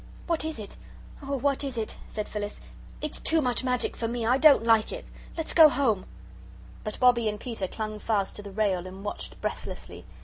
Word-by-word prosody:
"What 335 Hz, -3 st, 0 dB
is 315 Hz, 0 st, -3 dB
it? 210 Hz, -2 st, -9 dB, 0.4 s
Oh, 280 Hz, 0 st, -2 dB
what 280 Hz, +2 st, +1 dB
is 270 Hz, -3 st, -4 dB
it?" 220 Hz, -1 st, -3 dB
said 210 Hz, -1 st, -4 dB
Phyllis; 205 Hz, -1 st, -5 dB, 0.4 s
"it's 305 Hz, -, -4 dB
much -, -, -16 dB, 0.4 s
too -, -, -5 dB
magic 250 Hz, -1 st, 0 dB
for 230 Hz, -, -2 dB
me. 235 Hz, 0 st, -2 dB
I 250 Hz, +4 st, +3 dB
don't 285 Hz, -4 st, +7 dB
like 225 Hz, -2 st, +4 dB
it. -, -, -6 dB, 0.3 s
Let's 325 Hz, -, -3 dB
go 320 Hz, -2 st, +9 dB
home." 235 Hz, -9 st, +1 dB, 0.8 s
But 215 Hz, -, -5 dB
Bobbie 240 Hz, -3 st, +5 dB
and 210 Hz, 0 st, -4 dB
Peter 225 Hz, -6 st, -2 dB
clung 215 Hz, +1 st, -4 dB
fast 205 Hz, -3 st, 0 dB
to -, -, -6 dB
the 205 Hz, -, -8 dB
rail 190 Hz, -3 st, 0 dB
and 190 Hz, +2 st, -9 dB
watched 205 Hz, -, -4 dB
breathlessly. -, -, -5 dB
225 Hz, 200 wpm, -27 LUFS, 210-275 Hz, 0.8 s, go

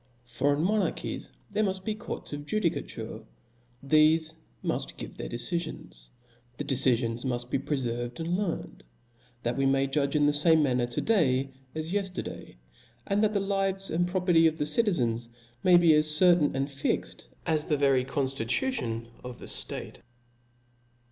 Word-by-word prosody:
For 135 Hz, +4 st, +1 dB
in 150 Hz, -, -1 dB
monarchies 210 Hz, +3 st, -1 dB, 0.2 s
there 215 Hz, -, +1 dB
muft 190 Hz, -2 st, -1 dB
be 215 Hz, -, 0 dB
courts 215 Hz, -7 st, -7 dB
of 145 Hz, 0 st, -6 dB
judicature; 215 Hz, -4 st, -2 dB, 0.6 s
thefe 155 Hz, +2 st, +4 dB, 0.3 s
muft -, -, -2 dB
give -, -, -8 dB
their -, -, -6 dB
de* -, -, -4 dB
cifions; 120 Hz, -, -5 dB, 0.5 s
the -, -, -3 dB
decifions 120 Hz, -4 st, +1 dB
muft 120 Hz, -2 st, -3 dB
be -, -, +1 dB
prefcFved 120 Hz, -3 st, -3 dB
and 165 Hz, +2 st, -1 dB
learnt, 190 Hz, -3 st, -3 dB, 0.6 s
that 120 Hz, 0 st, 0 dB
we 135 Hz, 0 st, +2 dB
may 135 Hz, 0 st, +3 dB
judge 140 Hz, +1 st, 0 dB
in 150 Hz, -1 st, +4 dB
the 145 Hz, -, +3 dB
fame 160 Hz, +1 st, +5 dB
manner 125 Hz, -3 st, +1 dB
to 120 Hz, -, -3 dB
day 135 Hz, -, +2 dB, 0.2 s
as 160 Hz, +1 st, -4 dB
yefterday, 195 Hz, -, -4 dB, 0.5 s
and 200 Hz, +2 st, +1 dB
that 215 Hz, 0 st, +2 dB
the 200 Hz, -, +2 dB
lives 195 Hz, -1 st, 0 dB
and 175 Hz, +2 st, +1 dB
property 180 Hz, -3 st, +4 dB
of 160 Hz, 0 st, -1 dB
the 150 Hz, -, 0 dB
citizens 130 Hz, -, +2 dB, 0.3 s
may 180 Hz, -1 st, +7 dB
be 170 Hz, -2 st, +6 dB
as 150 Hz, 0 st, +4 dB
certain 170 Hz, -1 st, +4 dB
and 135 Hz, +1 st, -1 dB
fixt 135 Hz, -1 st, -2 dB, 0.2 s
as 155 Hz, -2 st, 0 dB
the 150 Hz, -, +2 dB
very 135 Hz, -2 st, +3 dB
con 135 Hz, +1 st, -1 dB
ftitution 125 Hz, -, -1 dB, 0.2 s
of 125 Hz, -1 st, -7 dB
the -, -, -10 dB
ftate. -, -, -4 dB
150 Hz, 160 wpm, -28 LUFS, 130-180 Hz, 0.6 s, may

